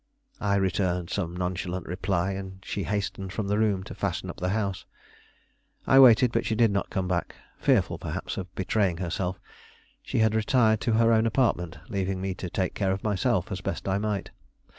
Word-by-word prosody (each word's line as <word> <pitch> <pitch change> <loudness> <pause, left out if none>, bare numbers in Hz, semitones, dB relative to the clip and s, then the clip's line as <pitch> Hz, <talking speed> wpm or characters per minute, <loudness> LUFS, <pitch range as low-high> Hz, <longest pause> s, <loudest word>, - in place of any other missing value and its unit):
I 100 -1 +1
returned 90 -2 0
some 90 -3 -2
nonchalant 90 0 -3
reply, 95 +1 -1
and 95 -1 -6
she 100 - -3
hastened 100 -2 -3
from 105 -1 -2
the 105 +1 +1
room 100 -4 +1
to - - -8
fasten - - -3
up - - -15
the 90 - -1
house. 100 -2 -1 1.0
I 135 - +6
waited, 125 -2 +7
but - - +1
she 110 - -1
did 115 -1 +4
not 100 0 -1
come 95 -1 -2
back; 90 -1 -2 0.2
fearful, - - +2
perhaps, - - -4
of 95 0 -5
betraying 95 -1 +1
herself, 90 +1 -3 0.6
she - - -4
had 110 -1 +3
retired 110 -1 +3
to 115 - +1
her 115 +1 +4
own 110 0 +3
apartment, 105 -8 0
leaving 95 -3 -2
me 95 0 -2
to 90 0 -6
take 95 +1 -1
care 95 -2 0
of 95 0 -3
myself 105 -1 0
as 95 -1 -3
best 95 - -4
I 95 +1 +1
might. 105 -2 -2
95 Hz, 190 wpm, -27 LUFS, 95-110 Hz, 1.0 s, waited